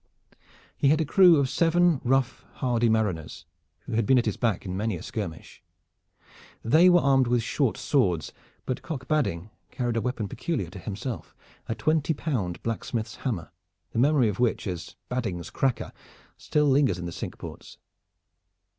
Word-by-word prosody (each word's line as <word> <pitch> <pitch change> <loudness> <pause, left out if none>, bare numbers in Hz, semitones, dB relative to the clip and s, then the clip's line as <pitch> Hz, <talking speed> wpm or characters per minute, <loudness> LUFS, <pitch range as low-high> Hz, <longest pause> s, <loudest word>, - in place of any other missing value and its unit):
He - - +1
had 150 +3 +4
a 160 - +1
crew 180 +3 +6
of 140 -2 +2
seven 170 +2 +3
rough, 135 0 +1
hardy 120 -3 +1
mariners, 95 -7 -1 0.4
who - - -10
had 110 -2 +1
been 130 - +5
at 120 - +2
his - - 0
back 115 -6 -1
in 90 -1 -4
many 105 +1 -1
a 85 - -8
skirmish. 95 -8 -6 1.0
They 155 +10 +6
were 175 -1 +5
armed 135 -3 +3
with 120 -1 +1
short 125 +1 0
swords, 90 - 0 0.3
but 130 - -3
Cock 140 -6 -6
Badding 110 - -1 0.2
carried 120 -2 -2
a - - +1
weapon 120 -3 -2
peculiar 110 - -3
to 95 - -9
himself, 105 +6 -6 0.3
a 110 - -2
twenty 155 +2 +1
pound 115 - -3
blacksmith's 115 0 -3
hammer, 105 - -4 0.4
the - - -2
memory 140 -2 +4
of 105 0 -3
which, 120 -2 +1
as 90 -3 -5
"Badding's 105 -10 -3
cracker," 135 -3 -1 0.4
still 150 -1 0
lingers 135 -9 +3
in 90 - -6
the 85 - -4
Cinque - - -6
Ports. - - -10
120 Hz, 165 wpm, -26 LUFS, 105-140 Hz, 1.0 s, crew